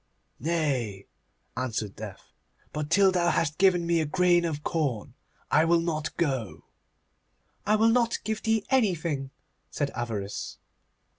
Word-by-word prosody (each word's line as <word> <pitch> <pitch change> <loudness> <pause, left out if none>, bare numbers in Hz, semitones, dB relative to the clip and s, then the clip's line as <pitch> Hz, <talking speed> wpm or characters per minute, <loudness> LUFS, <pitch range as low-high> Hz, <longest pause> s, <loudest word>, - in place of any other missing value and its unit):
'Nay,' 135 - -1 0.5
answered 115 -5 -3
Death, 105 -3 -10 0.4
'but 150 -1 -3
till 195 +2 +5
thou 175 -2 +2
hast 155 -2 0
given 180 -3 +4
me 170 -1 +2
a - - 0
grain 175 +1 +3
of 150 -3 -3
corn 140 -10 -2 0.4
I 155 - +5
will 170 +1 +4
not 155 -2 -3
go.' 130 - -2 1.0
'I 210 - +4
will 220 +1 +4
not 235 0 +2
give 220 0 -2
thee 220 -1 +1
anything,' 170 - +1 0.4
said 145 -2 -2
Avarice. 110 -5 -4
160 Hz, 135 wpm, -27 LUFS, 130-180 Hz, 1.0 s, till